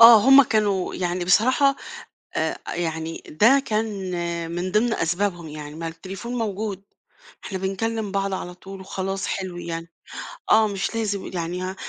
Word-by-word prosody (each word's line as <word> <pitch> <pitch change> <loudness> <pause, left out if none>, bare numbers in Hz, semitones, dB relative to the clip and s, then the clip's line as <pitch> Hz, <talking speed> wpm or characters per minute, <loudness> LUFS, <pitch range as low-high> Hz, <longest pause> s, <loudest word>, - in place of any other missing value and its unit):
آه 230 -1 +11
هم 270 +1 +10
كانوا 210 -6 +1
يعني 175 0 -1
بصراحة 255 +9 +4 0.6
آآ - - 0 0.2
يعني 160 -1 -3
ده 235 - +5
كان 215 +1 +1 0.7
من 175 +2 -2
ضمن 225 +3 +3
أسبابهم 175 -1 -1
يعني 150 0 -8
ما 165 +1 -4
التليفون 190 +8 -7
موجود. 205 -3 -2 0.6
إحنا 190 - -3
بنكلم 205 +2 -2
بعض 195 -1 0
على 180 -1 -4
طول 190 +2 -10
وخلاص 195 0 -3
حلو 185 -2 -3
يعني، 165 -1 -5 0.6
آه 220 0 +6
مش 200 +2 -2
لازم 205 -3 -2
يعني 175 +1 -3
ه 185 +1 -3
195 Hz, 145 wpm, -24 LUFS, 175-215 Hz, 0.7 s, آه